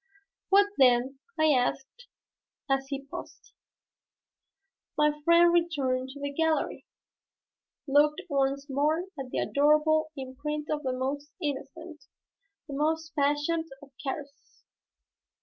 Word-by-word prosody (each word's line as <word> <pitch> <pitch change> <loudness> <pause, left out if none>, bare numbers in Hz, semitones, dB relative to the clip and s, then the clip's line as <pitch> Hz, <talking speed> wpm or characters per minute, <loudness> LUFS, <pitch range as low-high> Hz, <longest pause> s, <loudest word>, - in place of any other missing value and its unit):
"What 400 +1 +6
then?" 260 +1 +4 0.2
I 315 -1 +5
asked, 270 - -1 0.6
as 270 -1 0
he 275 0 -5
paused. 275 - -10 1.4
"My 300 0 +2
friend 340 +1 +6
returned 275 -7 0
to 280 +2 -10
the 285 0 -4
gallery, 320 +1 0 1.0
looked 295 +2 +3
once 275 -2 0
more 300 +5 +1 0.2
at 265 -1 -5
the - - -4
adorable 305 +2 +3
imprint 290 +3 -5
of 300 -1 -1
the 265 -3 -2
most 280 +3 -3
innocent, 300 +2 -6 0.6
the 285 - -7
most 315 +3 -1
passionate 295 +3 +1 0.2
of 280 - -15
caresses. 280 +1 -7
290 Hz, 115 wpm, -28 LUFS, 270-310 Hz, 1.4 s, What